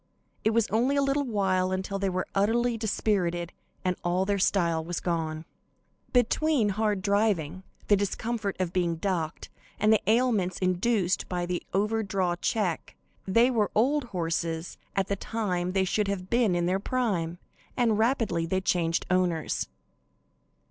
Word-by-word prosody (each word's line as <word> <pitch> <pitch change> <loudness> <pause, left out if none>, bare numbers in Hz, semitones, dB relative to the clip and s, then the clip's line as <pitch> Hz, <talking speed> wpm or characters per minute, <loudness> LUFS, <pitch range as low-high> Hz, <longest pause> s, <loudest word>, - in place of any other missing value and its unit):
It 220 - +3
was 225 0 +2
only 245 +6 +2
a 280 - +3
little 275 +1 +1
while 190 -5 +1
until 190 +1 -2
they 195 0 0
were 185 0 -1
utterly 230 +4 +2
dispirited 190 -6 -1 0.3
and 180 0 +1
all 180 +2 +1
their 200 0 0
style 170 -4 +2
was 170 +1 -3
gone. 160 -2 -2 0.7
Between 250 0 +2
hard 205 -1 0
driving, 200 -5 +1 0.3
the 205 - +6
discomfort 205 +1 -2
of 180 -2 -1
being 175 -2 +1
docked, 165 -2 -3 0.3
and 215 +1 +4
the 215 - +3
ailments 220 -6 +2
induced 185 +1 +1
by 175 -1 -1
the 175 0 -2
over 210 +3 +1
draw 190 -4 0
check, 180 -1 -2 0.3
they 230 +6 +4
were 215 -4 +1
old 270 +5 +2
horses 165 -4 -2 0.2
at 195 - +2
the 200 - 0
time 185 -4 -2
they 190 -1 +2
should 205 +2 0
have 190 -2 -4
been 235 -6 +3
in 175 0 +1
their 185 +2 +1
prime, 195 -9 -1 0.4
and 230 -4 +2
rapidly 220 -8 +1
they 190 +3 +1
changed 170 -3 0
owners. 180 -4 0
195 Hz, 155 wpm, -27 LUFS, 175-220 Hz, 0.7 s, the